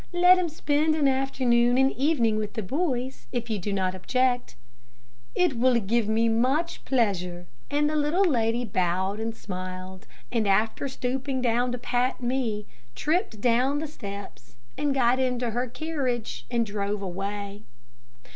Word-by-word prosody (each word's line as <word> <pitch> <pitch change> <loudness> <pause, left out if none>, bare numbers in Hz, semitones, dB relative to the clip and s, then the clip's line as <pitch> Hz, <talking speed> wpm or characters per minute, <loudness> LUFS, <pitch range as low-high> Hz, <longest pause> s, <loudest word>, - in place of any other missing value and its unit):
Let 360 +1 +6
him 350 -2 0
spend 305 0 +1
an 295 -3 +3
afternoon 255 -2 +2
and 265 +1 +4
evening 245 -6 +1
with 210 -1 -3
the 220 - -2
boys, 260 - -2
if 235 -2 -3
you 215 - -1
do 205 +3 -3
not 190 -2 0
object." 250 +6 0 0.8
"It 320 -10 +2
will 255 +1 +4
give 225 +1 0
me 225 +1 +2
much 260 +9 +1
pleasure," 180 -8 0 0.2
and 295 +1 +2
the 305 - -1
little 305 +6 +2
lady 240 -5 +1
bowed 190 +1 0
and 225 0 -3
smiled, 185 -1 -7 0.2
and 225 -3 +1
after 215 +7 +2
stooping 265 +1 -2
down 245 +1 +2
to - - -2
pat 245 +1 0
me, 240 -4 -1 0.3
tripped 300 - -1
down 250 +4 +3
the 310 - -2
steps, 200 - -9 0.2
and 285 -2 0
got 250 -1 +3
into 250 -2 0
her 245 +3 -1
carriage 250 - -3
and 235 -1 +1
drove 205 -1 -2
away. 200 +2 -4
240 Hz, 155 wpm, -26 LUFS, 205-270 Hz, 0.8 s, Let